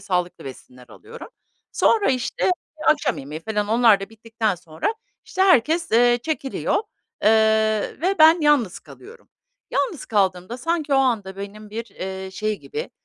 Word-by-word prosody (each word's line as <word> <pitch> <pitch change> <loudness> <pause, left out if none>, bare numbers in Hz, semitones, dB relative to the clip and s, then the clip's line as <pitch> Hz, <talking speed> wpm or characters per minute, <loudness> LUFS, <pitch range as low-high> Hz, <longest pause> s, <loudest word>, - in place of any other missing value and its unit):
sağlıklı 180 -2 -3
besinler 125 -2 -12
alıyorum. 460 +3 -12 0.4
Sonra, 430 -10 +3
işte, 255 +7 -1 0.4
akşam 305 - +2
yemeği 150 +4 -7
falan 210 +1 -2
onlar 225 -3 +4
da 195 - -6
bittikten 225 -1 -2
sonra, 170 - -4 0.3
işte, 375 - -1
herkes, 330 -1 +3
ııı, 240 +1 +4
çekiliyor, 275 0 -3 0.5
ııı, 220 0 +2
ve 385 +2 +2
ben 320 +2 +7
yalnız 285 - +2
kalıyorum. 475 +1 -15 0.4
Yalnız 360 - -2
kaldığımda 190 +1 0
sanki 305 +1 -1
o - - +4
anda 220 -8 0
benim 205 +1 -9
bir, 230 +2 -7
ııı, 190 0 -5
şey 215 +1 -2
gibi, 450 +2 -6
225 Hz, 145 wpm, -22 LUFS, 195-295 Hz, 0.5 s, ben